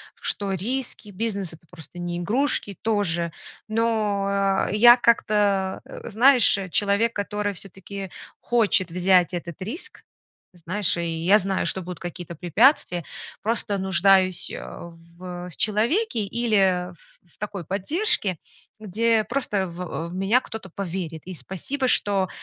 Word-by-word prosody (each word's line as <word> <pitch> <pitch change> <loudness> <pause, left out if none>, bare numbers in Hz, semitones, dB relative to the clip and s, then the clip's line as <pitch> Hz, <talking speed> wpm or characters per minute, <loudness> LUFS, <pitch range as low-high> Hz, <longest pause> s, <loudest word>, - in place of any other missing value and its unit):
что 200 -1 -2
риски, 230 +3 -4
бизнес- 200 -3 -1
это 165 +1 -16
просто 175 0 -11
не 175 0 -3
игрушки 205 - 0
тоже, 180 -6 0 0.4
но 200 -3 +1
я 240 +4 +8
как-то, 205 -5 +2 0.2
знаешь, 245 +1 +5
человек, 205 +4 +2
который 205 0 -2
всё-таки 195 +1 -8 0.3
хочет 210 -6 +2
взять 180 0 +3
этот 170 -1 -6
риск, 225 - -6 0.5
знаешь, 180 +3 -1
и 170 - -2 0.2
я 200 +4 +7
знаю, 195 -1 -1
что 190 - 0
будут 180 0 -7
какие-то 175 -1 -7
препятствия, 180 - +3 0.4
просто 215 -2 0
нуждаюсь, 190 -1 +3
а, 170 - -8 0.3
в 180 0 -7
человеке 230 - +1
или 195 -5 +1
в - - -21 0.4
в - - -26
такой 200 -3 -5
поддержке, 200 - 0 0.4
где 220 +2 +1
просто, 210 -7 -1
в 170 -1 -5
в - - -9
меня 195 +6 +3
кто-то 220 -6 -8
поверит. 175 -4 -4
И 185 - -7
спасибо, 225 - -3
что, 200 -6 +2
195 Hz, 125 wpm, -24 LUFS, 180-220 Hz, 0.5 s, я